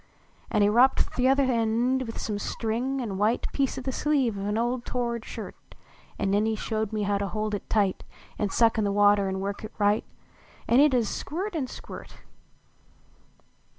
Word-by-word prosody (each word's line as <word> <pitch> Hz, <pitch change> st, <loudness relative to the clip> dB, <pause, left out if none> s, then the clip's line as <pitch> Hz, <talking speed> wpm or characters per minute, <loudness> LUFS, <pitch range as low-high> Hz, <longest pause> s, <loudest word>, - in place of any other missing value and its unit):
An 210 Hz, -, +2 dB
he -, -, +5 dB
wropt 245 Hz, +5 st, +3 dB
th -, -, -7 dB
uther 275 Hz, +1 st, +4 dB
end 245 Hz, +1 st, +1 dB
with 225 Hz, -, -6 dB
some 210 Hz, -2 st, -3 dB
string 240 Hz, +6 st, -2 dB
an 200 Hz, -5 st, -4 dB
white 215 Hz, +4 st, +1 dB
Piece 275 Hz, -2 st, 0 dB
o -, -, -3 dB
the 265 Hz, -, -3 dB
sleeve 270 Hz, -5 st, +1 dB
of 200 Hz, 0 st, -4 dB
a -, -, +1 dB
old 240 Hz, +1 st, -1 dB
tored 235 Hz, -2 st, -2 dB
shirt; -, -, -7 dB, 0.6 s
An 195 Hz, -, 0 dB
nen 205 Hz, +2 st, +2 dB
he 220 Hz, -, 0 dB
showed 220 Hz, -1 st, -2 dB
me 210 Hz, -2 st, -1 dB
to 200 Hz, 0 st, 0 dB
hold 215 Hz, +1 st, -3 dB
it 205 Hz, -, -4 dB
tight, 200 Hz, -4 st, +1 dB, 0.4 s
An 205 Hz, -, 0 dB
suck 225 Hz, +1 st, +3 dB
in -, -, +2 dB
the 200 Hz, -, +1 dB
water 205 Hz, -1 st, +4 dB
an 190 Hz, 0 st, -2 dB
work 200 Hz, +2 st, -4 dB
it 215 Hz, -, -7 dB
right 205 Hz, 0 st, +2 dB, 0.6 s
An 240 Hz, -, +5 dB
it 290 Hz, -2 st, +5 dB
ud 245 Hz, -, +4 dB
ist 220 Hz, -, -3 dB
squirt 380 Hz, +7 st, -4 dB
an 295 Hz, -6 st, -2 dB
squirt -, -, -10 dB
225 Hz, 195 wpm, -27 LUFS, 205-255 Hz, 0.6 s, he